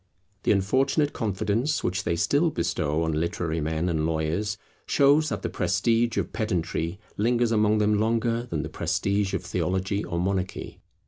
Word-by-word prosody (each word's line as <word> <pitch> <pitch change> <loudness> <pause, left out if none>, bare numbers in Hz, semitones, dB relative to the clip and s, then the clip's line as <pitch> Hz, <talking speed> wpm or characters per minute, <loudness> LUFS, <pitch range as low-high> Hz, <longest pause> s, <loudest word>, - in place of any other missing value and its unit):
The - - +2
unfortunate 135 +9 +2
confidence 110 +7 -1
which 90 +2 -1
they 85 - +1
still 145 - +2
bestow 80 - -1
on 80 - 0
literary 80 +1 -1
men 80 +3 -1
and 80 -3 0
lawyers 80 +6 -1 0.3
shows 145 +2 +4
that - - -4
the - - 0
prestige 115 0 +1
of - - -2
pedantry 90 -3 -2 0.2
lingers 120 +2 +2
among 105 -1 +3
them 105 0 +2
longer 115 +2 0
than 75 -3 -2
the - - -5
prestige 100 0 0
of - - -3
theology 95 +2 -1
or 85 -1 -3
monarchy. 95 +1 -3
100 Hz, 155 wpm, -26 LUFS, 85-115 Hz, 0.3 s, shows